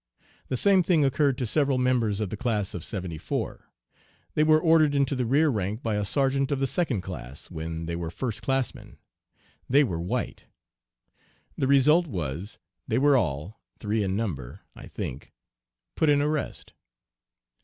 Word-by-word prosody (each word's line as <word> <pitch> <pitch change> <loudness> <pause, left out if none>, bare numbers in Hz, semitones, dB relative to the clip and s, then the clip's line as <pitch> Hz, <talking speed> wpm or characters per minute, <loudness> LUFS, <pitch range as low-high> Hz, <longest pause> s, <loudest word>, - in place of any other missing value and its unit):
The 130 - -1
same 195 +6 +4
thing 165 -4 +3
occurred 135 -1 +2
to 125 - -1
several 140 +2 +1
members 120 -5 +1
of 105 -4 -2
the - - -2
class 110 -6 -1
of 85 - -5
'74. 90 -5 -4 0.6
They 150 - +3
were 155 0 +5
ordered 155 -3 +4
into 140 0 +2
the 125 -2 -1
rear 150 +5 +4
rank 105 -1 -2
by 115 - -1
a 105 0 0
sergeant 135 +4 +1
of 140 - +1
the 135 - +1
second 135 - 0
class, 70 -7 -8
when 80 0 -5
they 85 0 -3
were 85 -1 -4
first 110 +4 -4
classmen. 135 +2 -2 0.7
They 140 +3 +5
were 85 -10 -2
white. 90 - -3 1.1
The 135 - 0
result 150 +5 +5
was 90 - -4 0.3
they 115 - +1
were 140 +2 +5
all, 85 - -1 0.2
three 105 +1 -1
in 95 -1 -1
number, 85 - -4
I - - -11
think, 65 - -7 0.6
put 160 - +2
in 145 -1 +5
arrest. 150 0 -2
125 Hz, 165 wpm, -26 LUFS, 95-140 Hz, 1.1 s, were